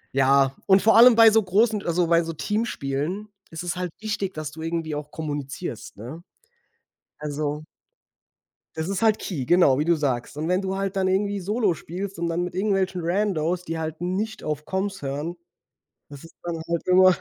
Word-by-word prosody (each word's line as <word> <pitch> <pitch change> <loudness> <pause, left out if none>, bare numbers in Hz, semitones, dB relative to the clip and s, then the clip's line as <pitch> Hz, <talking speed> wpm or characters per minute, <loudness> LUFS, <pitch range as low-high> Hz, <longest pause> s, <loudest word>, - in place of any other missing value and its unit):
ja, 135 0 +4
und 190 -1 +6
vor 220 - +5
allem 235 0 +9
bei 225 -1 +8
so 220 0 +4
großen 210 +3 +2
also 170 0 +1
bei 170 0 +4
so 165 0 -5
Teamspielen 190 - -2 0.2
ist 165 +1 -7
es 175 0 -2
halt 180 -2 -3
wichtig, 210 -3 -3
dass 155 -1 -5
du 160 +1 -10
irgendwie 165 -1 -3
auch 150 0 -6
kommunizierst, 145 - -5
ne? 135 +11 -9 1.0
Also 150 0 -3 1.1
Das 160 +3 -3
ist 195 +3 -1
halt 215 -1 +4
Key, 145 -10 -4
genau 170 -6 +5
wie 150 - 0
du 170 - +4
sagst. 135 -4 -2
Und 155 +2 -3
wenn 180 +2 +1
du 190 0 -2
halt 195 0 -2
dann 190 -1 +1
irgendwie 200 +1 0
solo 205 -1 0
spielst 185 +5 -6
und 170 0 -1
dann 170 +1 -1
mit 180 0 -5
irgendwelchen 190 -2 0
Randos, 180 -2 0
die 165 0 -3
halt 160 0 -5
nicht 195 +5 -3
auf 150 -1 -3
Coms 190 -3 -3
hören, 145 +6 -3 0.7
das 145 0 -12
ist 165 - -15
dann 170 -2 -4
halt 170 +1 -2
immer 185 0 +6
175 Hz, 190 wpm, -24 LUFS, 155-195 Hz, 1.1 s, allem